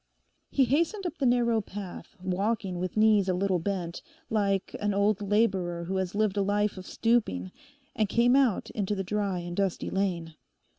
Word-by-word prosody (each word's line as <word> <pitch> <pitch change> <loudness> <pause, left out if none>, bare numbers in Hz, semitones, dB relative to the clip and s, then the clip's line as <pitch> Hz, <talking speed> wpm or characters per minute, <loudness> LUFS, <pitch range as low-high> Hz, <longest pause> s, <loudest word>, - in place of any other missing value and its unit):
He 270 - +3
hastened 335 - 0
up 350 - -4
the 270 - +2
narrow 235 -2 +3
path, 200 0 -8
walking 190 0 -1
with 185 +3 -3
knees 215 -3 +4
a 185 - +2
little 185 -1 +1
bent, 175 -1 -3 0.3
like 200 -3 0
an 205 -1 0
old 205 0 +2
labourer 195 -5 +1
who 190 +3 -2
has 190 0 -2
lived 210 -1 +1
a - - +3
life 205 +1 +1
of 185 -1 -9
stooping, 210 - 0 0.4
and 215 -4 +1
came 240 +4 +4
out 265 -7 +2
into 205 -1 -1
the 195 - -2
dry 195 -2 -1
and 175 0 -6
dusty 195 -2 -1
lane. 175 -4 -1
200 Hz, 180 wpm, -28 LUFS, 185-220 Hz, 0.4 s, knees